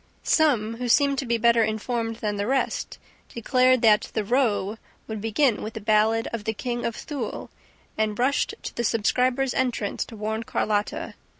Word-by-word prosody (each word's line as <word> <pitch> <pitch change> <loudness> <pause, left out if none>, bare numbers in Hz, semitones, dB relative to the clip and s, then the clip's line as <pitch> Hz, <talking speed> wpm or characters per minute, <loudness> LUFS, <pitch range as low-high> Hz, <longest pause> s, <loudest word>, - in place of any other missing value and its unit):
Some, 230 -8 +2
who 245 0 -3
seemed 280 +2 +3
to 270 - -3
be 235 0 +1
better 235 0 +4
informed 225 +1 -2
than 210 -2 -3
the 200 +1 -2
rest, 265 +1 -1 0.3
declared 255 +1 +2
that 215 -2 +4
the 215 - +1
"row" 220 -3 0 0.3
would 220 -2 -5
begin 225 +2 +1
with 215 - -5
the - - -4
ballad 215 +2 +2
of 230 -3 -3
the 220 - 0
KING 240 +1 -3
OF 230 - -4
THULE 275 -7 -5 0.5
and 215 -1 0
rushed 270 +4 +1
to - - -6
the 235 - -2
subscribers' 250 +4 +1
entrance 240 -5 -1
to 225 - -11
warn 220 +1 -3
Carlotta. 210 -2 -2
230 Hz, 175 wpm, -25 LUFS, 215-250 Hz, 0.5 s, better